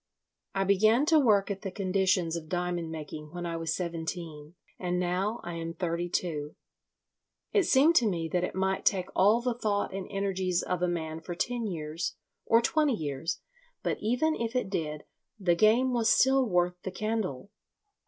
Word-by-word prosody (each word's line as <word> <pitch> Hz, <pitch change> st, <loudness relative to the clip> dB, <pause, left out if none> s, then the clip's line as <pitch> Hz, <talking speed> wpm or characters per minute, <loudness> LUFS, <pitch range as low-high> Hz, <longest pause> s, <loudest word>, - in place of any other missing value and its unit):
"I 195 Hz, -, +2 dB
began 215 Hz, +7 st, +4 dB
to 315 Hz, 0 st, +5 dB
work 210 Hz, -7 st, +3 dB
at 195 Hz, -, -4 dB
the 195 Hz, -, -4 dB
conditions 185 Hz, -3 st, +1 dB
of 160 Hz, -2 st, -6 dB
diamond 175 Hz, -1 st, -2 dB
making 150 Hz, 0 st, -7 dB
when 175 Hz, 0 st, -5 dB
I 170 Hz, -1 st, -3 dB
was 165 Hz, -1 st, -1 dB
seventeen, 165 Hz, -2 st, -5 dB, 0.2 s
and 180 Hz, -1 st, -1 dB
now 185 Hz, +5 st, -1 dB
I 175 Hz, -, -5 dB
am 165 Hz, 0 st, -5 dB
thirty 175 Hz, 0 st, -2 dB
two. 150 Hz, -4 st, -2 dB, 1.0 s
It 405 Hz, -4 st, +3 dB
seemed 290 Hz, +5 st, +5 dB
to 235 Hz, -, +4 dB
me 165 Hz, -4 st, -2 dB
that 180 Hz, +2 st, 0 dB
it 180 Hz, -, -3 dB
might 190 Hz, 0 st, 0 dB
take 185 Hz, -2 st, +1 dB
all 210 Hz, +5 st, +5 dB
the 250 Hz, 0 st, 0 dB
thought 205 Hz, -4 st, -1 dB
and 195 Hz, -1 st, -4 dB
energies 190 Hz, -2 st, -1 dB
of 180 Hz, -1 st, -2 dB
a 180 Hz, -, +2 dB
man 160 Hz, -2 st, -3 dB
for 175 Hz, +1 st, -6 dB
ten 235 Hz, +5 st, -1 dB
years, 160 Hz, -2 st, -4 dB, 0.3 s
or 230 Hz, +1 st, +5 dB
twenty 295 Hz, 0 st, +2 dB
years, 155 Hz, 0 st, -3 dB, 0.4 s
but, -, -, -1 dB
even 250 Hz, +9 st, +1 dB
if 230 Hz, -3 st, -3 dB
it 230 Hz, -6 st, -1 dB
did, 150 Hz, -5 st, -3 dB, 0.4 s
the 180 Hz, -3 st, +3 dB
game 225 Hz, +8 st, +4 dB
was 230 Hz, -2 st, +2 dB
still 265 Hz, -1 st, +4 dB
worth 180 Hz, -1 st, +1 dB
the -, -, -4 dB
candle. 200 Hz, -, -3 dB
185 Hz, 180 wpm, -29 LUFS, 170-215 Hz, 1.0 s, to